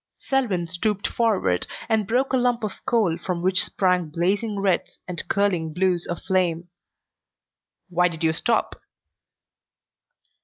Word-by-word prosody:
Selwyn 235 -11 0
stooped 195 +4 -2
forward 195 - +1 0.2
and 220 -3 +1
broke 255 +5 +1
a - - +4
lump 245 -2 +1
of 210 - -5
coal 215 -10 +2
from 175 -1 -3
which 185 0 +5
sprang 180 -4 +1
blazing 200 +6 -1
reds 195 -3 0
and 175 -1 -5
curling 180 -6 0
blues 180 -1 +1
of 175 - -4
flame. 175 -2 0 1.2
"Why 180 -1 +2
did 165 -1 -6
you 160 -1 +3
stop?" 230 +7 0
185 Hz, 130 wpm, -24 LUFS, 175-215 Hz, 1.2 s, which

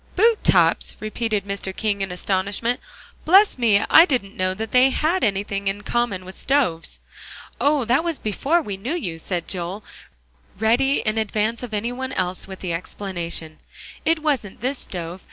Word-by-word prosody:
"Boot 445 +3 +3
tops!" - - +3
repeated 215 -1 -2
Mr. 195 -1 -4
King 205 -2 -1
in 195 -1 -2
astonishment. 200 +6 -1 0.4
"Bless 385 -2 +5
me, 220 -4 +4
I 330 - +8
didn't 240 - -2
know 185 0 0
that 220 +2 -5
they 255 +1 +6
had 325 +7 0
anything 200 -1 -1
in 195 +1 -1
common 230 -5 -1
with 185 +1 -10
stoves." 255 -13 0 0.6
"Oh! 285 -3 +2
that 250 +7 +2
was 335 -3 -2
before 290 +11 0
we 200 -7 -5
knew 250 - -3
you," 170 - -4
said 175 0 -3
Joel, 185 +3 -4 0.7
ready 240 +6 +2
in 215 0 0
advance 220 +1 -1
of 245 -2 -6
any 215 +3 -1
one 260 +1 -5
else 185 0 -2
with 190 -1 -9
the 180 -3 -2
explanation; 170 -3 -4 0.4
"it 320 -1 +1
wasn't 260 -12 -1
this 260 +2 -2
stove. 175 0 -6
215 Hz, 170 wpm, -22 LUFS, 190-260 Hz, 0.7 s, I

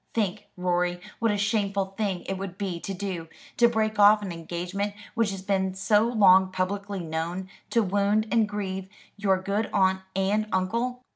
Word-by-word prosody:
Think, 210 -2 -1
Rorie, 180 0 0 0.2
what 230 - +2
a 205 - +1
shameful 200 -2 0
thing 195 -4 -1
it 195 - -3
would 190 -1 -6
be 190 -4 -3
to 195 - -5
do, 185 -3 -4 0.3
to 235 0 +6
break 220 -2 0
off 210 +1 +7
an 190 - -4
engagement 175 +5 -4 0.2
which 230 -3 +1
has 195 -1 -6
been 190 -1 0
so 210 +3 +3
long 190 -5 +5
publicly 195 +1 -2
known, 170 +3 -3 0.2
to 230 - +3
wound 205 +2 +1
and 225 -3 +3
grieve 190 -2 -4 0.3
your 195 -2 +1
good 200 +3 -1
aunt 190 -1 +2
and 200 +3 +1
uncle." 235 +7 -1
195 Hz, 170 wpm, -26 LUFS, 185-210 Hz, 0.3 s, off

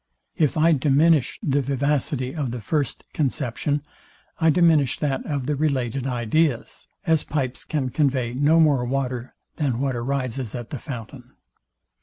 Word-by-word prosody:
If 155 -4 +1
I 165 +2 +5
diminish 150 0 +3
the 145 -5 +2
vivacity 140 0 -1
of 145 -6 -2
the 120 +1 -4
first 140 +6 -2
conception, 140 0 -1 0.6
I 160 -1 +4
diminish 155 -4 +4
that 140 -3 -1
of 140 -4 -2
the 150 +2 0
related 135 -3 -1
ideas; 125 +2 0 0.2
as 160 -3 +2
pipes 135 -4 -2
can 140 -4 -2
convey 130 -5 +1
no 145 +5 +4
more 145 -6 +4
water 125 -1 -3 0.2
than 135 -6 0
what 135 -1 0
arises 130 -1 -2
at 120 -2 -7
the 140 - -4
fountain. 125 0 -8
135 Hz, 145 wpm, -23 LUFS, 125-150 Hz, 0.6 s, I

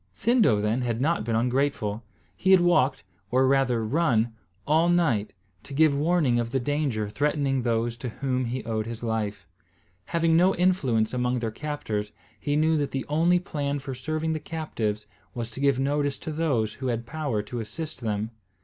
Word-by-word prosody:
Sindo, 215 - +3
then, 105 +4 0
had 120 -2 -1
not 155 -2 +1
been 115 0 -1
ungrateful; 120 -3 0 0.3
he 190 - -1
had 190 -1 +8
walked, 175 -6 +3 0.3
or 130 +3 +3
rather 130 -4 +2
run, 120 -4 +1 0.3
all 160 +3 +3
night, 150 -13 +2 0.3
to 140 - -9
give 155 -1 +4
warning 150 -5 +2
of 115 0 -2
the 135 - +1
danger 135 -5 -1
threatening 140 +2 0
those 115 0 0
to 125 - -5
whom 130 +2 -2
he 125 +2 -3
owed 110 -1 -2
his 115 0 -6
life. 105 -3 -2 0.6
Having 165 - +2
no 180 +3 +4
influence 135 -12 +2
among 125 0 0
their 115 -2 -2
captors, 110 -7 -4 0.3
he 145 -1 -1
knew 155 +1 +3
that 145 -2 0
the 135 - -3
only 165 +4 +3
plan 145 -5 -2
for 135 -1 -6
serving 155 +5 -2
the 155 - -2
captives 115 -10 -3 0.3
was 115 -1 -4
to 120 - -8
give 140 -2 +2
notice 145 +1 0
to 160 - -6
those 140 -9 0
who 130 - -5
had 120 -1 -2
power 140 -6 -2
to 120 +3 -5
assist 125 +6 -6
them. 110 -1 -2
130 Hz, 180 wpm, -26 LUFS, 115-155 Hz, 0.6 s, had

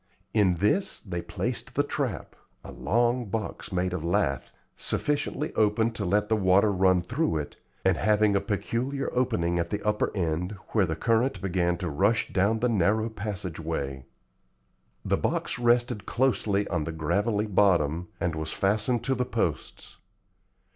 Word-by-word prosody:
In 100 -5 +3
this 105 - +1
they 85 -4 -5
placed - - -4
the - - +3
trap, - - -3 0.3
a - - -9
long 120 +3 +1
box 105 0 -4
made 90 0 0
of 90 -4 -3
lath, 70 -6 0 0.2
sufficiently 150 +1 -1
open 110 +2 +2
to 110 -2 -4
let 105 +3 +1
the 110 - +2
water 100 +1 +4
run 95 -1 +3
through 120 - -1
it, 75 -1 -5 0.3
and - - +3
having 105 0 +3
a 100 - +2
peculiar 125 +6 -2
opening 90 -9 +1
at 85 - -1
the 105 - -2
upper 105 0 +1
end 85 +2 -1 0.2
where 100 -5 +2
the 80 - -2
current 115 - +1
began 90 -2 0
to 90 - -4
rush 100 +9 +1
down 100 +4 +2
the 125 - +3
narrow 110 +1 +2
passage 100 -6 -5
way. 70 -5 -4 1.0
The - - +2
box - - -1
rested 120 -4 +2
closely 110 -5 +1
on 85 -5 0
the 80 - -3
gravelly 100 +7 0
bottom, 90 -5 +2
and 90 - 0
was 80 0 -4
fastened 110 +4 0
to 135 - +1
the 125 -1 0
posts. 90 - -3
100 Hz, 160 wpm, -27 LUFS, 85-115 Hz, 1.0 s, water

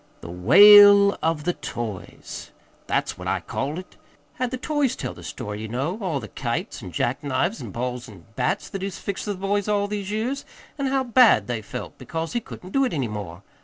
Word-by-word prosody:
'The 85 - -8
wail 200 - +8
of 160 -2 0
the 175 +2 0
toys' 110 - -7 0.4
that's - - -1
what - - -6
I - - 0
called 145 +4 -4
it 185 - -10 0.4
had 255 -1 -1
the 255 - -4
toys 290 -1 0
tell - - -5
the - - -13
story, 105 0 -6
ye 110 - -5
know, 135 - -3
all 170 -8 -1
the 110 - -8
kites 120 0 -4
an' 95 -4 -8
jack 125 - -1
knives 175 - -1
an' - - -7
balls 125 +1 -4
an' 95 -6 -14
bats - - -1
that 195 - -5
he's 195 -1 -4
fixed 200 -1 -4
for 205 - -2
the - - -9
boys 200 +1 -1
all 205 -1 +1
these 205 -1 -4
years, 235 +7 -2 0.4
an' 275 - 0
how 265 0 +1
bad 235 - +5
they 115 0 -3
felt 105 - -8
because 165 0 -4
he 240 - +1
couldn't 185 -4 -11
do 275 - +3
it 255 - 0
any 135 -6 -1
more. 100 -4 -7
175 Hz, 215 wpm, -24 LUFS, -, 0.4 s, wail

